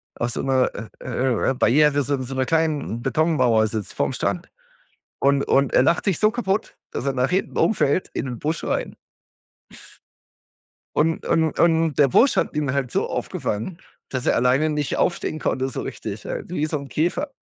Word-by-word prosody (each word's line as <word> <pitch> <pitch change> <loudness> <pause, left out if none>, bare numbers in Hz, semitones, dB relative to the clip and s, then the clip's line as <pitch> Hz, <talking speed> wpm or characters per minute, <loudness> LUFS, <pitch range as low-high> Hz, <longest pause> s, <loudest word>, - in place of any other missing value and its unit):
auf 120 - -2
so - - -3
'ner, 130 -1 +2
äh, 110 +1 -7
äh, 125 -1 -1
äh, - - +4
äh, - - 0
Barriere, 145 +3 +3
so 140 - -1
'n 130 - -4
so 130 +1 -6
'ner 130 0 +1
kleinen 155 -7 0
Betonmauer 130 -6 +2
sitzt 110 -3 -4
vorm - - -1
Strand - - -2 0.7
und, 140 0 +3
und 140 -1 +3
er - - +6
lacht 170 +6 +2
sich 195 -5 +1
so 215 - +5
kaputt, 220 -3 -2 0.2
dass - - -4
er 140 - +1
nach 125 +1 +1
hinten 190 +2 -1
umfällt 185 -5 +2
in - - -2
'nen 125 -2 -5
Busch 155 +5 -2
rein. - - -2 2.0
Und 160 +2 +1
und 160 -2 +1
und 165 -2 +3
der 145 -2 +6
Busch 260 - +4
hat - - 0
ihn 145 -3 0
halt 135 -3 -1
so - - 0
aufgefangen, 115 - -3 0.3
dass 130 -2 -3
er - - +3
alleine 130 +6 +3
nicht 150 -2 -1
aufstehen 170 -2 0
konnte 130 -3 -1
so - - -4
richtig, 105 -1 -6
halt - - -5
wie 155 -4 -1
so 155 - -2
'n 140 -1 -9
Käfer. 180 - -1
140 Hz, 190 wpm, -23 LUFS, 130-160 Hz, 2.0 s, er